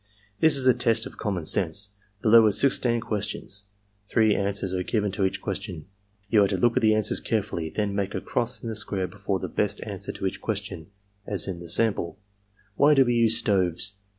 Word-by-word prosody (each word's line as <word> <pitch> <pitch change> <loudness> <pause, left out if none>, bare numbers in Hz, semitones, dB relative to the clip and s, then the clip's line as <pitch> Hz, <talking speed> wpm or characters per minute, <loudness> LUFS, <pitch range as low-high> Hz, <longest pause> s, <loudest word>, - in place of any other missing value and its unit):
"'This 160 -2 +4
is 130 - +2
a 130 - +6
test 115 -2 +1
of - - -11
common 95 -7 -3
sense. 100 +5 +3 0.3
Below 115 0 +6
are - - +3
sixteen 120 +1 +1
ques 105 -3 -2
tions. 100 +1 -5 0.4
Three 110 -2 +3
answers 100 -1 -1
are 90 - -1
given 105 +1 -1
to 95 0 0
each 95 - -3
question. 95 -5 -5 0.4
You 105 0 +4
are - - +3
to 95 - -2
look 115 +5 +2
at 130 - +2
the 110 -1 +4
answers 110 -1 +1
carefully; 100 -7 -2
then 105 +3 -2
make 100 0 -2
a - - -1
cross 120 +2 -2
in 115 - -4
the 110 - -4
square 100 -3 -2
before 100 +1 -3
the - - -5
best - - -1
answer - - -6
to - - -6
each - - -3
question, 80 - -4 0.4
as 100 -1 -2
in 90 -3 -5
the 85 -1 -9
sample: 100 -3 +2 0.2
" 100 0 -42
' 100 -1 -36
Why 145 +1 +5
do 135 -1 +5
we 120 - +1
use 115 -1 +3
stoves? 100 -3 +1
105 Hz, 220 wpm, -25 LUFS, 95-115 Hz, 0.4 s, a